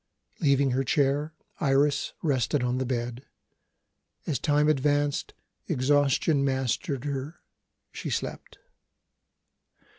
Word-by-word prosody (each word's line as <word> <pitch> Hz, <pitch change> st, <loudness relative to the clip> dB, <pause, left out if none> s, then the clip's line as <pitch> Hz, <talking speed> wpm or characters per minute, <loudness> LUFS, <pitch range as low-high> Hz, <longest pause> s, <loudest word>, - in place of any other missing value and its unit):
Leaving 140 Hz, -4 st, +3 dB
her 130 Hz, +2 st, +1 dB
chair, 145 Hz, +2 st, +1 dB, 0.2 s
Iris 140 Hz, 0 st, +2 dB
rested 135 Hz, -2 st, +1 dB
on 125 Hz, +1 st, 0 dB
the 130 Hz, -, -2 dB
bed. 120 Hz, 0 st, -3 dB, 1.0 s
As 150 Hz, -, -1 dB
time 150 Hz, -1 st, +2 dB
advanced, 145 Hz, 0 st, +1 dB, 0.3 s
exhaustion 140 Hz, +2 st, +2 dB
mastered 135 Hz, +1 st, -1 dB
her; 145 Hz, +4 st, -4 dB, 0.5 s
she -, -, -5 dB
slept. -, -, -4 dB
140 Hz, 95 wpm, -27 LUFS, 130-145 Hz, 1.0 s, Leaving